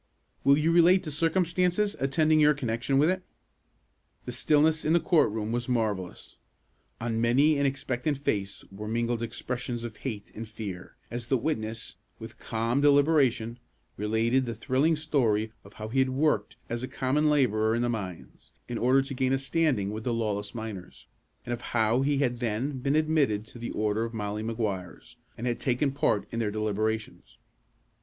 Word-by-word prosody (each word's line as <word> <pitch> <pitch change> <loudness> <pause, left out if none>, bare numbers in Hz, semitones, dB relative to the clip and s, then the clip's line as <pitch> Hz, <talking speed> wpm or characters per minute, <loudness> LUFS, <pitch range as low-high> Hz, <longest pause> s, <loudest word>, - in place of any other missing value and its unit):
"Will 140 +1 +5
you 155 +2 +2
relate 175 +2 +5
the 155 - -5
circumstances 180 +5 +1
attending 155 +3 +3
your 150 0 +5
connection 125 +1 -1
with 145 +3 +5
it?" 185 0 -2 1.0
The 125 - -4
stillness 155 +5 +2
in 155 - +2
the 170 - +5
court 165 0 +3
room 110 +1 -3
was 120 +1 -2
marvellous. 105 -7 -2 0.6
On 115 -1 -1
many 140 +6 +4
an 140 - +3
expectant 135 +1 -2
face 100 -8 -2
were 105 +2 -7
mingled 115 +1 -1
expressions 120 +1 -4
of 115 -2 -7
hate 110 -6 -6
and 115 +1 -7
fear, 105 -4 -7 0.2
as 120 0 -4
the 130 - +2
witness, 110 -5 -3 0.2
with - - -10
calm 115 +4 -1
deliberation, 140 -5 +3 0.4
related 115 +5 +1
the 115 - -3
thrilling 130 +8 +1
story 115 -9 0
of 100 - -15
how 110 - -7
he 135 +4 0
had 130 0 +3
worked 130 -6 0
as 120 0 -3
a 130 - -3
common 145 +5 +1
laborer 110 -6 +2
in 120 - 0
the - - +1
mines, 100 -7 -6
in 120 - -4
order 130 +3 +4
to 135 +1 -6
gain 130 0 +1
a - - +3
standing 135 -7 0
with 110 +1 -5
the 120 - -1
lawless 105 -1 -2
miners, 110 -5 -7 0.4
and 120 - -2
of 120 - -5
how 115 +1 +1
he 140 +1 +1
had 125 -4 0
then 125 +4 -2
been 140 +3 0
admitted 155 -9 +2
to 120 - -12
the 120 - -4
order 105 +1 0
of 115 0 -5
Molly 105 0 -3
Maguires, 110 0 -4 0.2
and 120 - -5
had 120 -1 -1
taken 135 +2 +1
part 140 -7 0
in 115 - -3
their 110 -2 0
deliberations. 110 +1 -3
120 Hz, 180 wpm, -28 LUFS, 110-140 Hz, 1.0 s, Will